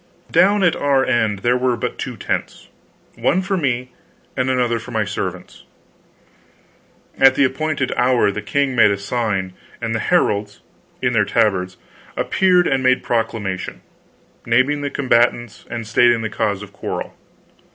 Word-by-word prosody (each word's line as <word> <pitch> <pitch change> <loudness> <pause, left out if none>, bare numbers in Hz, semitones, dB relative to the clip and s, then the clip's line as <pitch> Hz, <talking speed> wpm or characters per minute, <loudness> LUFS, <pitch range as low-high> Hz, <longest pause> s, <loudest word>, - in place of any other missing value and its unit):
Down 200 +2 +4
at 175 - +3
our 140 -2 +2
end 110 -5 0
there 120 +1 +3
were 125 -1 +1
but - - -4
two - - -5
tents; - - -4 0.5
one 185 +2 +1
for 195 +1 -1
me, 125 -6 -1 0.4
and 130 0 0
another 120 -2 +1
for - - -11
my - - -1
servants. - - -6 1.6
At 135 0 +6
the 140 - +3
appointed 140 0 -1
hour 125 -4 +2
the 105 - -5
king 135 +4 -1
made 115 - +6
a 100 - 0
sign, 100 -3 -2 0.3
and 115 -1 -3
the 115 - -1
heralds, 105 - 0 0.4
in - - +1
their - - +3
tabards, 95 -3 0 0.4
appeared 180 -2 +3
and 135 -3 +1
made 130 0 +2
proclamation, 110 -5 -3 0.6
naming 130 +5 +2
the 145 - -2
combatants 120 -4 0
and 115 -2 -5
stating 115 +1 +3
the 110 - -3
cause 100 -2 -1
of 100 -1 -13
quarrel. - - -5
120 Hz, 150 wpm, -19 LUFS, 110-135 Hz, 1.6 s, At